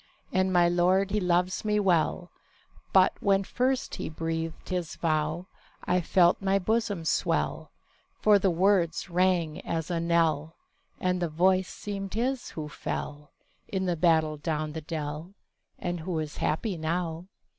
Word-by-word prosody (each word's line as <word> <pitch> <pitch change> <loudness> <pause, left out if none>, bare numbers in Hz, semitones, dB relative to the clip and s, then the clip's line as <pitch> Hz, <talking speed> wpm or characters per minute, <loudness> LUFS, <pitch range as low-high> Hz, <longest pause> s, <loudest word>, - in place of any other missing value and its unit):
And 185 0 +2
my 175 -1 +5
lord 180 +3 +2
he 210 - +1
loves 180 0 +1
me 210 -1 +1
well; 175 -2 +1 0.6
But, 185 -1 +5
when 195 -1 +2
first 255 +6 -1
he - - -4
breathed 165 0 -4
his 180 -3 -3
vow, 155 +1 -1 0.4
I 180 0 +1
felt 175 +2 +3
my 195 0 +2
bosom 205 -3 -1
swell— - - 0 0.5
For 210 -1 +5
the 195 - +2
words 180 -1 +1
rang 175 -3 +1
as 165 +1 -3
a 170 - 0
knell, 165 -2 +1 0.4
And 180 0 0
the 175 - 0
voice 185 +4 +2
seemed 195 -1 -5
his 250 +3 -1
who 155 -2 -6
fell 150 0 -5 0.4
In 190 -1 -2
the 175 -1 0
battle 160 -2 +2
down 155 0 -2
the 160 - -5
dell, 155 +3 -5 0.4
And 175 -1 -3
who 165 +1 -3
is 155 -1 -4
happy 185 +4 -1
now. 165 +1 -2
175 Hz, 150 wpm, -28 LUFS, 160-190 Hz, 0.6 s, my